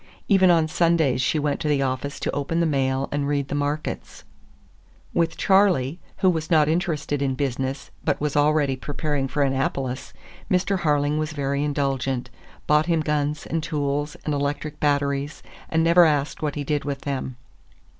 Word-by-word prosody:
Even 190 -3 +5
on 165 -2 +4
Sundays 160 -6 +2
she 155 - +1
went 145 -1 0
to - - -2
the 145 -2 +2
office 135 +2 -3
to - - -1
open 145 +4 -1
the 170 - +3
mail 135 -3 0
and 145 -1 -1
read 140 -1 -1
the - - -3
markets. 145 +1 -3 0.9
With 165 -1 0
Charley, 185 -7 +3 0.2
who 185 - +3
was 160 -2 -3
not 155 -3 +4
interested 155 -4 -1
in 135 -2 0
business, 135 0 -3
but - - 0
was 150 -1 -2
already 145 -2 +3
preparing 145 0 -2
for 140 +2 0
Annapolis, 135 -1 -2 0.4
Mr. 190 +1 +1
Harling 150 -2 +1
was 155 0 -2
very 140 -1 -1
indulgent; 135 -3 -1 0.3
bought 150 +1 +3
him 165 -2 +2
guns 150 -1 -1
and 165 +1 -2
tools 145 -2 -2
and 150 - 0
electric 145 +1 -2
batteries, 145 0 0 0.3
and 160 0 +2
never 170 +2 +6
asked 150 -3 +1
what 150 -2 -2
he 145 - -3
did 145 0 -1
with 140 -1 -4
them. 130 -2 -3
145 Hz, 170 wpm, -24 LUFS, 140-155 Hz, 0.9 s, never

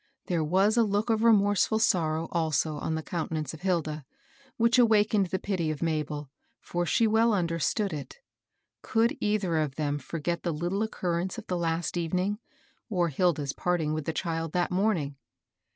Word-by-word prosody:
There 170 -3 0
was 190 +8 +2
a 235 - +6
look 210 +2 0
of 220 - +2
remorse^ 205 -3 +4
ftd 220 - +1
sorrow 165 -5 +1
also 155 -2 0
on 160 +2 -2
the 160 - -3
countenance 160 -4 -3
of 160 - -10
Hilda, 160 -5 -1 0.5
which 235 +2 +4
awakened 215 -4 +4
the 190 - -1
pity 185 -4 -2
of 155 +1 -3
Mabel, 150 -3 -2 0.3
for 175 0 -3
she 230 - +3
well 225 +1 +3
understood 175 +2 0
it 150 - -7 0.6
Could 230 +5 +1
either 205 -6 +1
of 150 -4 -1
them 145 -1 -1
forget 165 +4 -3
the 170 - -1
little 175 +6 -1
occurrence 185 -3 -2
of 225 - -7
the 180 - -2
last 170 0 -1
evening, 180 +5 -1 0.5
or 175 -5 +1
Hilda's 150 -3 0
parting 170 -4 0
with 155 -2 -3
the - - 0
child 165 -1 -3
that 180 +1 0
morning 180 -8 0
175 Hz, 170 wpm, -28 LUFS, 155-205 Hz, 0.6 s, a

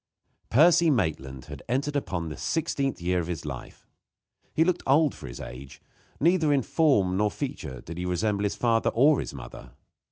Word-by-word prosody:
Percy 165 +6 +5
Maitland 75 - -1
had - - -9
entered 140 +4 -1
upon 85 - -2
the 75 - -6
sixteenth 140 -4 -1
year 90 +1 0
of 85 - -3
his 85 -3 -5
life. - - -8 0.6
He 160 - +3
looked 180 +1 0
old 145 +2 +4
for 70 - -10
his - - -8
age. 65 +2 -9 0.4
Neither 165 -1 +3
in 140 -3 +2
form 110 - +2
nor 105 +1 +3
in 105 - -6
feature 130 - -5
did 85 +5 -8
he 90 - -3
resemble 100 +3 0
his 100 - -1
father 115 -2 +2
or 140 +5 +4
his - - -5
mother. - - -10
115 Hz, 185 wpm, -27 LUFS, 85-145 Hz, 0.6 s, Percy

